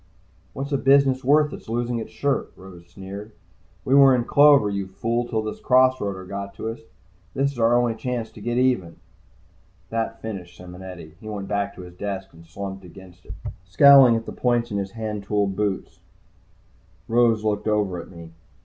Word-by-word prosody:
"What's 140 +2 -5
a 140 - +1
business 135 -1 +3
worth 150 +2 +3
that's - - -10
losing 120 +1 -1
its 110 - -6
shirt?" 140 -2 -1
Rose 90 -2 -14
sneered. 100 +4 -9 0.5
"We 130 - +1
were 135 -1 +7
in 120 - 0
clover, 140 -6 +6
you 100 -1 -3
fool, 115 +5 -2
till 110 -2 -2
this 110 - -5
cross 130 0 +4
roader 95 -2 -5
got 100 0 -6
to 110 - -4
us. 115 - -6 0.6
This 140 +1 +1
is 130 - -10
our 115 +1 +4
only 120 -1 +2
chance 120 0 -4
to 110 - -13
get 120 +3 -2
even." 125 -10 +1 1.0
That 115 0 -2
finished 90 -6 -7
Simonetti. 90 -3 -11
He 110 - -9
went 100 -2 -5
back 100 -1 -2
to - - -10
his 90 0 -12
desk 95 0 -6
and 85 0 -16
slumped 95 +2 -7
against 90 0 -15
it, - - -8 0.3
scowling 130 +5 +7
at 115 0 -3
the - - -6
points 120 -2 0
of 100 - -1
his 100 0 -4
handtooled 105 -3 -2
boots. 100 -1 -3 1.1
Rose 115 -2 +3
looked 105 0 -1
over 100 -5 0
at - - -14
me. 85 -2 -12
110 Hz, 185 wpm, -23 LUFS, 95-120 Hz, 1.1 s, were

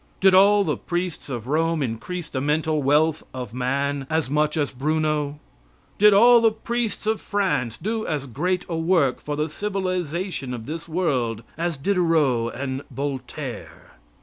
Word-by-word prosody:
Did 190 0 +5
all 200 +2 +6
the - - -1
priests 175 -3 -4
of 120 -4 -4
Rome 160 +2 +1
increase 135 +9 -4
the 130 - -3
mental 155 +1 +1
wealth 150 +3 +3
of 125 -4 -6
man 135 +2 -1
as 160 -4 0
much 150 +1 +1
as 145 -2 0
Bruno? 150 +1 -1 0.6
Did 210 +1 +7
all 235 +4 +7
the 225 - +5
priests 230 0 -3
of 220 0 0
France 145 - -1
do 220 +2 -3
as 150 -3 -2
great 180 +9 -1
a 170 - -3
work 160 -5 +2
for 150 - -3
the 150 +1 -1
civilization 185 -6 -3
of 110 -2 -8
this 165 +4 -6
world 130 - -1
as 170 -1 -2
Diderot 150 -8 +1
and 130 0 -3
Voltaire? 135 -2 -6
155 Hz, 155 wpm, -23 LUFS, 135-185 Hz, 0.6 s, Did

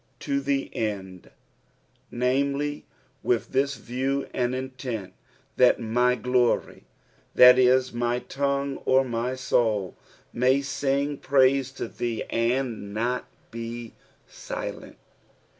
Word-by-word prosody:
To 140 -1 -1
the 140 0 -2
end 95 -5 -4 0.8
"^Dnme]y, 140 +4 0 0.4
with 120 -2 0
this 140 +1 +1
view 135 +3 -2
and 125 0 0
intent 130 -7 -5 0.2
— - - -36
"that 125 - +5
my 125 +2 +2
glory" 125 +1 0 0.3
— - - -36
that 125 0 +9
is, 130 0 +4
my 120 0 0
tongue 140 +1 -2
or 130 +1 +4
my 120 +1 -2
soul 110 -7 0
— - - -27
" - - -38
may 130 +3 +2
ting 140 +1 -1
praiie 135 -1 +3
to 120 - -4
thee, 115 0 -3
and 115 -3 -1
not 120 +3 -1 0.3
be 115 0 -6 0.3
lilerU." - - -7
125 Hz, 125 wpm, -26 LUFS, 120-135 Hz, 0.8 s, that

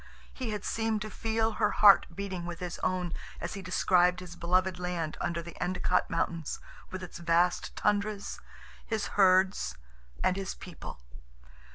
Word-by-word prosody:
He 255 -3 -4
had 210 -2 -4
seemed 225 -1 0
to 215 - -7
feel 225 0 0
her 210 -1 +1
heart 205 -2 +7
beating 190 -3 -4
with 175 -1 -5
his 180 -1 -5
own 180 -2 -1 0.3
as - - -4
he 200 - -5
described 180 -1 +3
his 180 -2 -9
beloved 180 +1 +1
land 175 -3 -2
under 170 -1 -1
the 170 0 -9
Endicott 180 0 +1
Mountains, 165 -2 -1 0.3
with 185 0 -6
its 180 - -8
vast 170 +1 +2
tundras, 205 0 0 0.4
his 220 -2 -2
herds, 190 - +4 0.5
and 185 - +2
his 195 0 -3
people. 170 - -9
185 Hz, 155 wpm, -30 LUFS, 175-205 Hz, 0.5 s, heart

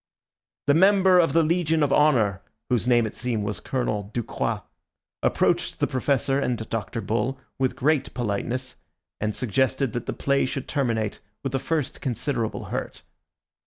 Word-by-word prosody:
The 145 - +4
member 190 +2 +6
of 165 - +3
the 165 0 +5
Legion 160 -1 +2
of 140 -1 +2
Honour, 115 -11 +3 0.3
whose 120 -1 +1
name 120 -2 +4
it 110 - -4
seemed 120 -4 -2
was 105 -3 -3
Colonel 105 -6 -2
Ducroix, 120 -2 -2 0.6
approached - - +1
the - - +3
Professor 135 +1 +1
and 125 -3 0
Dr. 115 +1 -2
Bull 115 +5 -1 0.2
with 130 -1 +1
great 150 +1 +1
politeness, 120 +2 -2 0.4
and 105 0 -1
suggested 130 +1 0
that 120 - -4
the - - -1
play 140 -1 +1
should 135 0 -4
terminate 115 -7 -1 0.2
with 135 - -2
the 135 - 0
first 155 -1 -2
considerable 120 -2 -2
hurt. - - -4
130 Hz, 155 wpm, -25 LUFS, 115-145 Hz, 0.6 s, member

